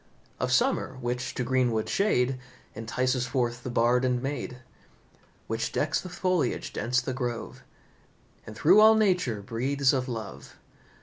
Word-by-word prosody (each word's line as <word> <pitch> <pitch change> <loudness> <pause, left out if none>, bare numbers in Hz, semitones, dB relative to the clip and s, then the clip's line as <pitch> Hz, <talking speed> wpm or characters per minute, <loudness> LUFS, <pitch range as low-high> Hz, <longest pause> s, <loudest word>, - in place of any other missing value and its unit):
Of - - -1
summer 130 - +1
which 125 +1 -3
to 125 - -1
greenwood 125 -3 +1
shade 135 -11 +1 0.3
Entices 125 +3 -1
forth 120 -1 -1
the 125 - -5
Bard 120 +1 +2
and 125 -1 +1
maid; 135 -1 -4 0.9
Which 115 +1 -2
decks 155 - 0
with 180 -1 -8
foliage 180 -10 -1
dense 125 +4 0
the 130 +1 -4
grove, 120 -3 -4 0.9
And 110 - -8
through 180 - +5
all 220 +1 +8
nature 180 - +1
breathes 130 +6 +1
of 130 -1 -1
love. 110 -5 -7
125 Hz, 140 wpm, -27 LUFS, 120-135 Hz, 0.9 s, all